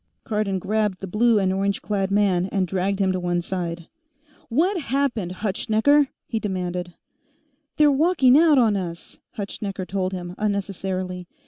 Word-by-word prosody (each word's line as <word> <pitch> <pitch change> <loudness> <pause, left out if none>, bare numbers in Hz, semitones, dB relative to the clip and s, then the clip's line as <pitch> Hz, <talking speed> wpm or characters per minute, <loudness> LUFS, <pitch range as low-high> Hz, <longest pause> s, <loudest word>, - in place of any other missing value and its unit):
Cardon 210 -3 -1
grabbed 210 0 -1
the - - -5
blue 220 +4 +3
and 190 -2 +1
orange 195 +1 -1
clad 195 -2 -1
man 195 -3 +2
and 190 -2 -1
dragged 195 +2 -1
him 195 -1 +2
to 185 - -1
one 175 -1 0
side. 170 -2 -4 0.6
"What 350 - +1
happened, 245 -9 -1
Hutschnecker?" 225 +8 +3 0.2
he 225 - -2
demanded. 180 -3 -4 0.8
"They're 300 -1 +5
walking 280 -3 +4
out 310 -1 +6
on 225 -5 +4
us," 170 -3 -6 0.2
Hutschnecker 200 -2 -4
told 185 -1 -2
him, 180 -1 -6
unnecessarily. 190 -3 -3
195 Hz, 145 wpm, -23 LUFS, 185-220 Hz, 0.8 s, out